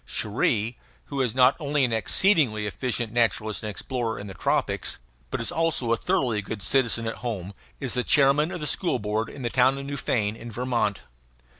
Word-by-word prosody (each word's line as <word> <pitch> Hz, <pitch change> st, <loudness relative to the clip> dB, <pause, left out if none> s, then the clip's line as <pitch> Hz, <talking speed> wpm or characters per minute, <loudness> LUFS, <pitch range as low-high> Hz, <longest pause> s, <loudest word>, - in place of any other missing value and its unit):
Cherrie 110 Hz, +1 st, 0 dB, 0.3 s
who 140 Hz, -, 0 dB
is 125 Hz, -3 st, 0 dB
not 130 Hz, +1 st, +6 dB
only 145 Hz, -2 st, +1 dB
an 120 Hz, -, -1 dB
exceedingly 115 Hz, -, +3 dB
efficient 115 Hz, +2 st, -2 dB
naturalist 110 Hz, -2 st, +1 dB
and 110 Hz, -, -4 dB
explorer 115 Hz, +1 st, -3 dB
in 100 Hz, -, -7 dB
the 95 Hz, -, -8 dB
tropics, -, -, 0 dB, 0.3 s
but -, -, -3 dB
is 115 Hz, -, -3 dB
also 160 Hz, -8 st, +1 dB
a -, -, +4 dB
thoroughly 125 Hz, -, 0 dB
good 100 Hz, 0 st, -6 dB
citizen 115 Hz, +1 st, +2 dB
at 115 Hz, -, -3 dB
home 100 Hz, -4 st, -5 dB, 0.3 s
is -, -, 0 dB
the 125 Hz, -, +1 dB
chairman 145 Hz, +4 st, +4 dB
of 180 Hz, -3 st, -5 dB
the -, -, -2 dB
school 170 Hz, -1 st, +1 dB
board 105 Hz, +1 st, -2 dB
of 135 Hz, -, -9 dB
the 120 Hz, -, 0 dB
town 130 Hz, +1 st, +4 dB
of 140 Hz, -, -6 dB
Newfane, 115 Hz, -7 st, -1 dB
in 120 Hz, +1 st, -9 dB
Vermont. 115 Hz, -4 st, -1 dB
120 Hz, 190 wpm, -25 LUFS, 110-135 Hz, 0.3 s, not